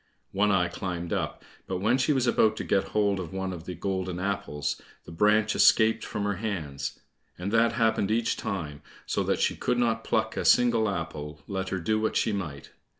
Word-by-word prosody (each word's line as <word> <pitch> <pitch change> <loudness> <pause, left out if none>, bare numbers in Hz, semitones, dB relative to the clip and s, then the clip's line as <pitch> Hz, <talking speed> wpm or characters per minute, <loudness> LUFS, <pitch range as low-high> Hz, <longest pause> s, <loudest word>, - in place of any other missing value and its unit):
One 105 +2 +2
eye 90 -3 +3
climbed 85 -1 -4
up, - - -3 0.2
but 95 - -2
when 110 +7 +2
she 130 - +2
was 130 -3 +2
about 110 -2 +3
to - - -3
get 95 - +1
hold 100 -2 +1
of 90 -2 -6
one 95 -1 -3
of 85 -1 -8
the 90 - -5
golden 95 0 -2
apples, 100 -6 -2 0.2
the - - -10
branch 105 +5 +3
escaped 110 0 +5
from 105 - -4
her 100 -2 -1
hands, 75 -10 -4 0.4
and 90 +3 -4
that 115 +1 +3
happened 110 -4 +1
each 115 +1 +1
time, 80 -7 -4 0.2
so - - -1
that - - 0
she - - +1
could 125 - 0
not 115 -2 +1
pluck 110 -1 0
a - - -2
single 115 -3 +4
apple, 75 -5 -5
let 95 -1 -3
her 95 - -1
do 110 +5 0
what 110 - 0
she - - +2
might. 80 -8 -5
100 Hz, 205 wpm, -27 LUFS, 90-110 Hz, 0.4 s, escaped